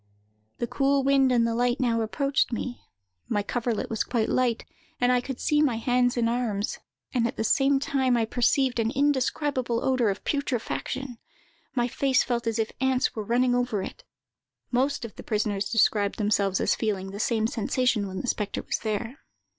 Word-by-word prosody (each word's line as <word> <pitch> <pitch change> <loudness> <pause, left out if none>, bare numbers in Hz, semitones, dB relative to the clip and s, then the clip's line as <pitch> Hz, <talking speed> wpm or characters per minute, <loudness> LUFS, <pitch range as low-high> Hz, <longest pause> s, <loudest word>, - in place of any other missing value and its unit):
The - - -1
cool 275 +3 +1
wind 270 -1 +4
and 235 -2 +3
the 230 - 0
light 245 +1 +1
now 235 -3 +1
approached 275 +6 0
me; 245 +1 -4 0.5
my 205 -2 0
coverlet 235 +1 -2
was 220 - -1
quite 230 -3 -1
light, 245 -3 +1 0.3
and 245 0 +3
I 250 -1 +3
could 265 0 -6
see 300 0 +2
my 275 -6 +2
hands 245 +2 +1
and 235 -1 +2
arms; 230 -3 -1 0.3
and 235 -3 +2
at - - -6
the - - 0
same 275 +4 +3
time 265 -3 +1
I 225 - +2
perceived 245 +2 +1
an 225 0 +1
indescribable 265 -2 0
odor 255 -4 +2
of 195 - -3
putrefaction; 265 -2 -3 0.6
my 240 -1 +2
face 265 +2 +2
felt 235 -2 -2
as 225 0 0
if 220 -1 -1
ants 265 0 +1
were 220 - -2
running 245 +3 +2
over 245 -5 0
it. - - -8 0.7
(Most 260 +1 0
of 225 - -10
the - - -8
prisoners 210 -2 -1
described 210 -3 +2
themselves 200 -3 +1
as - - +2
feeling 195 -4 -2
the 200 - -7
same 220 0 +1
sensation 230 -1 0
when 190 0 -5
the 250 - -6
spectre 210 -3 -2
was - - -2
there.) 225 +4 -3
240 Hz, 185 wpm, -26 LUFS, 220-260 Hz, 0.7 s, wind